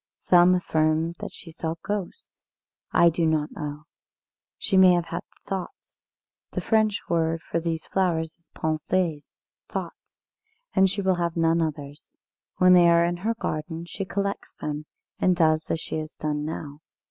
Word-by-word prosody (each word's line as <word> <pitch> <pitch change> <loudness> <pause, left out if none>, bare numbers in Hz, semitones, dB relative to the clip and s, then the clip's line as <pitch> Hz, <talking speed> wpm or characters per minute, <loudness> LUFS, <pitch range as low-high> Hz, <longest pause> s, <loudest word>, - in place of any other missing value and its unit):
Some 180 0 +5
affirm 160 -1 +1
that - - -6
she 165 - -12
saw 160 0 -3
ghosts. 205 - -5 0.4
I 170 - +6
do 170 +1 -1
not 155 -1 0
know 150 -1 -6 0.7
she 195 - 0
may 185 -1 +8
have 175 -1 +1
had 170 - -4 0.3
Thoughts. 190 -2 -6 0.6
The - - -1
French 215 -2 +2
word 165 -1 0
for 170 - -2
these 165 -1 -3
flowers 165 -4 0
is 170 - -31
pensées 160 0 -1 0.4
thoughts - - -6 0.6
and 190 0 +5
she 200 +1 -2
will 190 -1 +2
have 170 0 -1
none 165 0 +3
others. 145 -2 -5 0.4
When 185 0 +6
they 175 -1 +7
are 170 0 +5
in 175 0 -1
her 220 +6 -1
garden 160 -4 -4
she 195 - -5
collects 200 +1 -3
them, 150 0 -4 0.3
and 185 -1 +3
does 155 -2 +2
as 165 - 0
she - - -4
has 155 0 -7
done 150 -1 -2
now. 150 -2 -6
170 Hz, 160 wpm, -25 LUFS, 155-180 Hz, 0.7 s, may